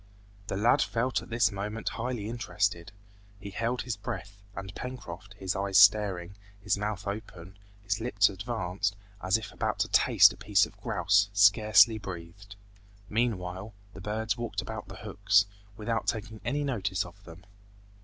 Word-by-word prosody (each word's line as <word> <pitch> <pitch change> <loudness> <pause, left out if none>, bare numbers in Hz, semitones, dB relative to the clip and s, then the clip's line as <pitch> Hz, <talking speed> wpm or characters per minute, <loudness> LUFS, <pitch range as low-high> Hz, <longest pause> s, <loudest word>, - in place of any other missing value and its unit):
The 95 - -2
lad 115 +4 +4
felt 120 +2 0
at - - -13
this 115 -2 +2
moment 105 +3 -3
highly 115 -3 -4
interested. 100 -7 -2 0.5
He 100 -1 -8
held 115 +4 -2
his 125 -3 -3
breath, 100 0 -7
and 95 -1 -7
Pencroft, 105 -7 -8
his 95 -2 -2
eyes 95 -1 +1
staring, 100 -3 +5 0.3
his 100 0 0
mouth 105 -1 -3
open, 100 -3 -7 0.2
his 100 +2 -1
lips 105 -4 +3
advanced, 100 -1 -2 0.3
as 95 +3 +2
if 110 0 -8
about - - -2
to - - +1
taste - - +6
a - - -15
piece - - +3
of - - -14
grouse, 100 +3 +2
scarcely 110 +2 +6
breathed. 95 +1 -9 0.5
Meanwhile, 105 -3 -2 0.2
the 95 - -10
birds 110 +1 -2
walked 120 -1 -3
about - - -7
the - - -9
hooks, 100 0 +3 0.3
without 110 +1 -2
taking 110 -1 -3
any 145 +5 -1
notice 100 -10 -1
of 90 +3 -14
them. 85 +2 -13
100 Hz, 155 wpm, -29 LUFS, 95-110 Hz, 0.5 s, taste